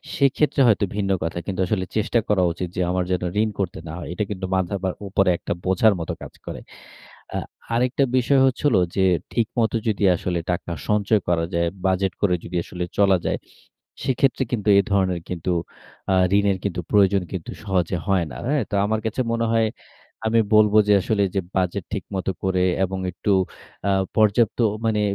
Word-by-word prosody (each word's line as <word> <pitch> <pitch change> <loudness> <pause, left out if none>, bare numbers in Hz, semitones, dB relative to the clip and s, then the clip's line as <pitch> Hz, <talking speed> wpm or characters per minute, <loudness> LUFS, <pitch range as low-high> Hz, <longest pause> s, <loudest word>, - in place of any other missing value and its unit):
সেক্ষেত্রে 140 -1 +2
হয়তো 105 -2 +3
ভিন্ন 100 -2 0
কথা 85 +1 -3
কিন্তু 95 -2 -4
আসলে 95 -2 -1
চেষ্টা 115 +2 +2
করা 95 -3 +2
উচিত 90 +2 -4
যে, 90 - -1
আমার 90 0 0
যেন 90 -1 0 0.2
ঋণ 110 - +1
করতে 95 -4 -2
না 80 - -6
হয়। - - -7
এটা 105 - -1
কিন্তু 95 -2 -4
মাথার 95 +1 -1 0.3
উপরে 100 -1 +2
একটা - - -3
বোঝার 100 +3 +4
মতো 80 - -3
কাজ - - -9
করে। - - -6 0.8
আ - - 0 0.4
আরেকটা 125 +3 +2
বিষয় 135 +2 +3
হচ্ছে 130 +1 0
হোল - - +3 0.2
যে, 95 -1 +3 0.3
ঠিকমত 115 -1 0 0.2
যদি 105 -2 0
আসলে 85 0 -2
টাকা 85 0 -3 0.2
সঞ্চয় 105 0 +2
করা 85 -1 +1
যায়, 85 0 +1 0.2
বাজেট 95 0 +1
করে 90 -3 +3
যদি 90 - -7
আসলে 90 -1 -5 0.2
চলা 95 -2 +5
যায়, - - -1 0.6
সেক্ষেত্রে 130 +1 +1
কিন্তু 110 -3 -2
এ - - +6
ধরনের 95 -3 +1
কিন্তু, 90 0 -2 0.6
আ - - +4 0.2
ঋণের 100 -2 +2 0.3
প্রয়োজন 100 -2 +4
কিন্তু 90 -4 -5
সহজে 90 -3 0
হয় 95 -4 +2
না। - - -8
হ্যাঁ? 145 -4 +1
তো - - 0
আমার 110 +1 0
কাছে 110 +4 -1
মনে 115 0 0
হয় 115 -1 +3 0.6
আমি 115 +1 +3 0.2
বলব 105 -1 +5
যে, 105 - +5
আসলে 100 -1 +1
যে 95 - +2
বাজেট 95 0 0
ঠিকমত 95 -2 -4 0.2
করে 95 -1 +1 0.2
এবং 95 0 -5
একটু 100 +4 -2 0.6
আ - - +3 0.3
পর্যাপ্ত 110 +2 +3 0.3
মানে 105 -1 +1
100 Hz, 180 wpm, -23 LUFS, 90-110 Hz, 0.8 s, এ